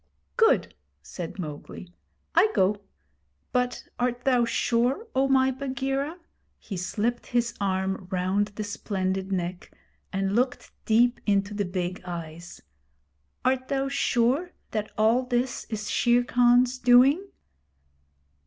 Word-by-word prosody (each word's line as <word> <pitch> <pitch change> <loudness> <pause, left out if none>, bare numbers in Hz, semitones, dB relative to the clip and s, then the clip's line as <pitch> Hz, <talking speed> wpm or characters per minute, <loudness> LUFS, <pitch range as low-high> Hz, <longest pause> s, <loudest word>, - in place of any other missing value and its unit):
'Good!' 450 0 +3 0.3
said 175 0 -7
Mowgli. 175 +2 -8 0.4
'I 430 - +5
go. 200 +2 +2 0.7
But 250 0 -1
art 245 0 -1
thou 250 -3 +3
sure, 245 - +1
O 270 +1 +2
my 265 -1 +4
Bagheera' 270 +3 -3 0.4
he 200 - -7
slipped 215 +6 -2
his 240 -2 0
arm 190 -1 -1
round 190 +2 0
the 215 - -3
splendid 190 -2 -3
neck, 180 -1 -3 0.4
and 195 0 -1
looked 250 +2 0
deep 240 +2 +3
into 200 0 +1
the 205 -1 -1
big 180 0 -3
eyes 170 -1 -8 0.4
' 70 -1 -44
art 260 0 +1
thou 275 0 -1
sure 275 +5 +1 0.2
that 215 -1 -2
all 220 +3 +4
this 250 0 -2
is 215 -2 -4
Shere 240 +2 +3
Khan's 245 +1 +3
doing?' 255 +8 +5
235 Hz, 125 wpm, -26 LUFS, 190-255 Hz, 0.7 s, I